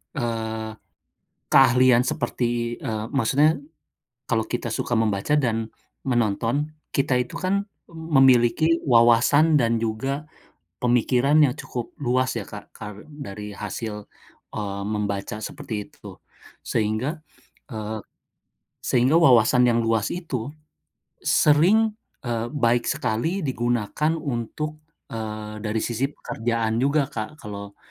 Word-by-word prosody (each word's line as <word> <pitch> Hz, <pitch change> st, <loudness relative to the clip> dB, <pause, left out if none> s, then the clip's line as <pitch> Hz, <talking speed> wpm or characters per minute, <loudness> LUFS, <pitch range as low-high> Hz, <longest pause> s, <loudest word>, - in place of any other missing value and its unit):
eee, 110 Hz, -3 st, -3 dB, 0.8 s
keahlian 125 Hz, -2 st, +5 dB
seperti 120 Hz, -2 st, -1 dB
eee, 110 Hz, 0 st, -3 dB
maksudnya, 140 Hz, +5 st, +3 dB, 0.8 s
kalau 110 Hz, -2 st, +1 dB
kita 120 Hz, -1 st, -3 dB
suka 120 Hz, +2 st, -1 dB
membaca 110 Hz, +5 st, +1 dB
dan 115 Hz, -6 st, 0 dB, 0.4 s
menonton, 120 Hz, +4 st, 0 dB, 0.2 s
kita 135 Hz, -2 st, +2 dB
itu 125 Hz, -, -3 dB
kan 200 Hz, +2 st, 0 dB, 0.2 s
memiliki 150 Hz, -1 st, +4 dB
wawasan 130 Hz, +6 st, +5 dB
dan 115 Hz, -2 st, +2 dB
juga 135 Hz, +6 st, -2 dB, 0.6 s
pemikiran 125 Hz, +3 st, +2 dB
yang 135 Hz, -, +4 dB
cukup 120 Hz, -2 st, -5 dB
luas 130 Hz, -2 st, +1 dB
ya -, -, -8 dB
Kak, -, -, -10 dB
karen 105 Hz, 0 st, -9 dB
dari 105 Hz, -8 st, -7 dB
hasil, 105 Hz, +1 st, -6 dB, 0.5 s
eee, 100 Hz, -2 st, -3 dB
membaca 105 Hz, +1 st, -3 dB
seperti 110 Hz, -, -6 dB
itu. -, -, -13 dB, 0.5 s
Sehingga 115 Hz, +8 st, -1 dB, 0.5 s
eee, 110 Hz, -1 st, -4 dB, 0.9 s
sehingga 130 Hz, +6 st, +4 dB
wawasan 125 Hz, -4 st, +5 dB
yang 120 Hz, -1 st, +3 dB
luas 115 Hz, -2 st, +1 dB
itu, 135 Hz, -10 st, -4 dB, 0.7 s
sering 190 Hz, +10 st, +4 dB, 0.3 s
eee, 115 Hz, -1 st, -1 dB
baik 120 Hz, -5 st, +1 dB
sekali 160 Hz, -, -1 dB
digunakan 120 Hz, +3 st, 0 dB
untuk, 150 Hz, +1 st, -4 dB, 0.3 s
eee, 110 Hz, -1 st, -5 dB
dari 110 Hz, 0 st, -2 dB
sisi 120 Hz, +3 st, -1 dB
pekerjaan 115 Hz, -4 st, -2 dB
juga 140 Hz, +2 st, +3 dB
Kak, 110 Hz, +7 st, -5 dB
kalau 100 Hz, -1 st, -8 dB
120 Hz, 110 wpm, -24 LUFS, 110-140 Hz, 0.9 s, keahlian